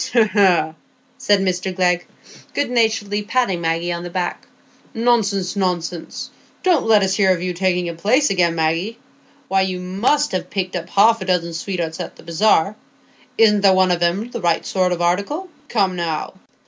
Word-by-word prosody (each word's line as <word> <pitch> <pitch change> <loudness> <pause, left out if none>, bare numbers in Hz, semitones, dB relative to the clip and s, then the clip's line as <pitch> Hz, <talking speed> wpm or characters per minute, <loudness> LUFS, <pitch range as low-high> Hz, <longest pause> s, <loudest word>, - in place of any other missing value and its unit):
"Hegh, 235 -2 +5
hegh!" 185 -5 +3 0.5
said 205 -6 +2
Mr 185 0 -1
Glegg, 180 -1 +1 0.5
good 285 -4 -1
naturedly 220 -3 +1
patting 210 -5 0
Maggie 165 +1 -1
on 170 0 -3
the 175 - -6
back, 175 0 -4 0.5
"nonsense, 215 -5 +1
nonsense! 180 -3 -3 0.3
Don't 350 -10 +2
let 215 -3 +5
us 190 0 +1
hear 195 -1 +3
of 180 -1 -1
you 180 -1 -2
taking 180 0 0
a 170 - -4
place 220 - +2
again, 175 -3 +2
Maggie. 165 +8 -1 0.5
Why, 195 0 +2
you 185 -1 -2
must 210 +12 0
ha' 185 - -1
picked 185 -2 -3
up - - -5
half 220 +2 +4
a - - -4
dozen 170 -2 0
sweethearts 165 -2 -4
at - - -6
the - - -16
bazaar; 195 +2 +2 0.6
isn't 210 -2 +4
there 195 -1 +5
one 185 -1 +3
of 175 -1 0
'em 190 +8 0
the - - -5
right 170 -2 +1
sort 185 -1 0
of 175 -1 -1
article? 200 - -1 0.2
Come, 195 -5 +1
now?" 165 -3 -3
190 Hz, 180 wpm, -20 LUFS, 175-210 Hz, 0.6 s, Hegh